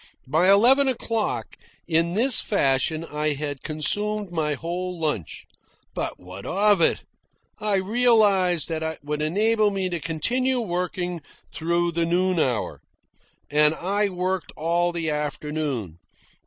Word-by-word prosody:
By 160 Hz, +8 st, +2 dB
eleven 250 Hz, +8 st, +6 dB
o'clock, 225 Hz, -, -2 dB, 0.3 s
in 165 Hz, +1 st, +1 dB
this 245 Hz, +3 st, +4 dB
fashion 155 Hz, -2 st, +1 dB
I 150 Hz, -1 st, -1 dB
had 145 Hz, -1 st, -5 dB
consumed 205 Hz, +6 st, -1 dB
my 155 Hz, -3 st, -1 dB
whole 175 Hz, +4 st, -4 dB
lunch. 150 Hz, -, -3 dB, 0.5 s
But -, -, -4 dB
what 90 Hz, +2 st, -10 dB
of 205 Hz, 0 st, +2 dB
it? -, -, +2 dB, 0.6 s
I 210 Hz, -1 st, 0 dB
realised 195 Hz, -, +3 dB
that 160 Hz, -1 st, -2 dB
it 160 Hz, -1 st, -3 dB
would 150 Hz, +1 st, -3 dB
enable 210 Hz, +7 st, +2 dB
me 195 Hz, -2 st, -2 dB
to 175 Hz, -1 st, -3 dB
continue 250 Hz, -, 0 dB
working 180 Hz, -3 st, -3 dB, 0.3 s
through 170 Hz, +1 st, 0 dB
the 170 Hz, 0 st, 0 dB
noon 180 Hz, +1 st, +1 dB
hour. 125 Hz, -7 st, -1 dB, 0.7 s
And 150 Hz, +1 st, +4 dB
I 200 Hz, +4 st, 0 dB
worked 185 Hz, -3 st, -2 dB
all 170 Hz, +2 st, +1 dB
the 165 Hz, -2 st, -2 dB
afternoon. 150 Hz, -, -3 dB
175 Hz, 130 wpm, -24 LUFS, 150-200 Hz, 0.7 s, eleven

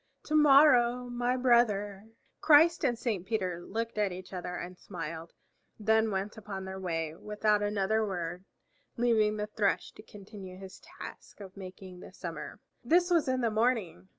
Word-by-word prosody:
To 310 Hz, -, -2 dB
morrow 270 Hz, -5 st, +6 dB
my 245 Hz, +1 st, 0 dB
brother." 215 Hz, -5 st, +2 dB, 0.3 s
Christ 320 Hz, +3 st, +5 dB
and 245 Hz, -4 st, +1 dB
Saint 205 Hz, -7 st, -3 dB
Peter 185 Hz, -6 st, -2 dB
looked 225 Hz, +2 st, -4 dB
at 205 Hz, -2 st, +1 dB
each 185 Hz, +1 st, -9 dB
other 180 Hz, -1 st, -5 dB
and 180 Hz, +1 st, -6 dB
smiled, 165 Hz, -2 st, -7 dB, 0.5 s
then 220 Hz, +1 st, +2 dB
went 195 Hz, +1 st, -3 dB
upon 195 Hz, -3 st, -6 dB
their 190 Hz, 0 st, -6 dB
way 165 Hz, -4 st, -3 dB
without 210 Hz, +2 st, 0 dB
another 205 Hz, +1 st, +1 dB
word, 180 Hz, -3 st, -4 dB, 0.5 s
leaving 220 Hz, -3 st, +2 dB
the 210 Hz, -, -2 dB
Thrush 210 Hz, -1 st, -1 dB
to -, -, -14 dB
continue 200 Hz, -3 st, -11 dB
his 190 Hz, 0 st, -11 dB, 0.2 s
task -, -, -10 dB
of 190 Hz, -2 st, -11 dB
making 185 Hz, -1 st, -10 dB
the -, -, -11 dB
summer. 170 Hz, -3 st, -7 dB, 0.2 s
This 350 Hz, +8 st, +3 dB
was 335 Hz, -5 st, +3 dB
in 260 Hz, 0 st, 0 dB
the 230 Hz, -2 st, +1 dB
morning. 215 Hz, -, 0 dB
210 Hz, 160 wpm, -30 LUFS, 185-235 Hz, 0.5 s, morrow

